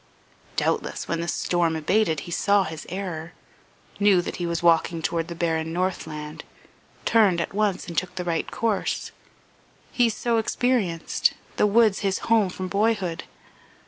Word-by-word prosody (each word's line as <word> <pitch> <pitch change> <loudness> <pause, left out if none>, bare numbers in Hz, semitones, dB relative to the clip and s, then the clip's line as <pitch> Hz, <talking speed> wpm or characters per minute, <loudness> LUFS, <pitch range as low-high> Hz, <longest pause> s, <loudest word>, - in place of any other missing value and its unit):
Doubtless - - -1
when 165 0 -1
the 170 - -3
storm 170 -2 +1
abated 160 -1 +1
he 175 - -9
saw 200 +3 +3
his 160 -3 -7
error, 175 -3 -5 0.7
knew 200 -3 +5
that - - -5
he 175 - -2
was 170 0 -2
walking 165 -1 +3
toward 165 0 -1
the 170 - -6
barren 160 -1 -1
northland, 160 -4 -3 0.6
turned 205 -6 +4
at - - -3
once 205 -2 0
and 170 - -6
took 180 +2 -1
the 180 - -3
right 165 -2 -1
course 225 -3 -1 0.8
he 240 -2 +3
so 230 +1 0
experienced, 220 -7 +1 0.2
the - - +4
woods 215 -1 +4
his 195 -2 0 0.2
home 215 -4 +4
from 185 +1 -5
boyhood. 200 -4 0
180 Hz, 150 wpm, -25 LUFS, 165-205 Hz, 0.8 s, knew